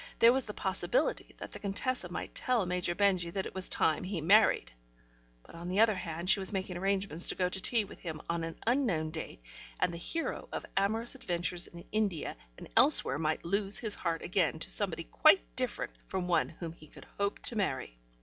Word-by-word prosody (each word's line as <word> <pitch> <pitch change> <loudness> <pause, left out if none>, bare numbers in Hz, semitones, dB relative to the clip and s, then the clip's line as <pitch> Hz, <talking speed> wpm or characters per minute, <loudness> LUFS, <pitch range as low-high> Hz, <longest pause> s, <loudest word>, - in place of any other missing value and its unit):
There 235 +1 +7
was 265 -1 0
the 210 - -5
possibility - - -1
that - - -8
the - - -9
Contessa 205 0 -1
might 175 - -5
tell 245 -6 +1
Major 180 -1 -1
Benjy 185 -4 +2
that 190 -1 -2
it - - -7
was 190 -1 -3
time 155 - +2
he 185 -1 -3
married, 170 - +4 0.7
but - - -16
on 170 +1 -8
the 185 +3 -1
other 220 -1 +5
hand 170 -2 -5
she 205 +1 +5
was 190 - +2
making 190 -2 -3
arrangements 190 -2 +2
to - - +3
go 180 - +1
to 190 +1 0
tea 225 +1 +3
with 200 - -13
him 160 -3 -6
on 170 0 -2
an 165 0 -5
unknown 220 - +1
date, 160 - -6 0.4
and 175 - +1
the 170 - -6
hero 330 - -4
of - - -5
amorous 220 +4 0
adventures 175 0 -2
in 170 0 -12
India 205 -7 -1 0.2
and - - -10
elsewhere 140 - +5
might 155 +1 -1
lose 200 +3 0
his 220 -3 -3
heart 165 -4 -2
again - - +1
to - - +2
somebody - - +3
quite - - +3
different - - -1 0.2
from 180 -1 -3
one 175 -1 +2
whom 165 0 -7
he 155 -2 -16
could - - -14
hope 200 0 0
to 240 - +4
marry. 130 - -2
185 Hz, 205 wpm, -31 LUFS, 170-205 Hz, 0.7 s, There